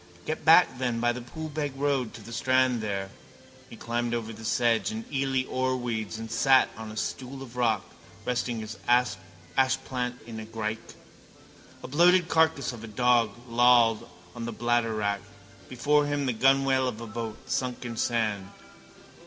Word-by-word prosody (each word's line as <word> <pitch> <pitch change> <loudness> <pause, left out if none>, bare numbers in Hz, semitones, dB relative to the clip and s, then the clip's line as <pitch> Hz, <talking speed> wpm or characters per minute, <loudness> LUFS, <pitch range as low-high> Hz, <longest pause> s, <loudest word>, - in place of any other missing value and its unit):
Get 155 - -3
back 160 -5 +6
then 120 -3 -1
by 120 +1 +2
the 125 +1 -5
Poolbeg 150 +2 -5
road 135 -5 0
to 115 - -10
the 115 - -9
strand 130 -1 +2
there. 100 -2 -3 0.6
He - - -10
climbed 120 0 -2
over 115 -1 -4
the 110 +1 -11
sedge 115 - +2
and 220 +1 -5
eely 135 -1 0
oarweeds 120 -5 -2
and 110 0 -7
sat 135 -1 +4
on 110 0 -8
a 110 - -9
stool 135 +3 -4
of 125 -2 -12
rock, 115 -5 +1 0.4
resting 120 -2 -1
his 110 0 -7 0.8
ashplant 130 -2 0
in 115 -1 -7
a 110 - -7
grike. 110 0 -5 0.9
A - - -5
bloated 175 +4 +4
carcass 160 -5 +2
of 115 -2 -10
a - - -7
dog 120 +1 +3 0.2
lay 115 0 -9
lolled 120 -2 +5 0.2
on 120 -1 -6
bladderwrack. 115 -3 0 0.5
Before 145 +4 +2
him 145 -1 -1
the 130 - 0
gunwale 135 +2 +3
of 115 -3 -4
a 115 - -6
boat, 110 0 -5
sunk 125 -1 -2
in 120 -1 -5
sand. 110 -5 -1
120 Hz, 160 wpm, -27 LUFS, 115-130 Hz, 0.9 s, back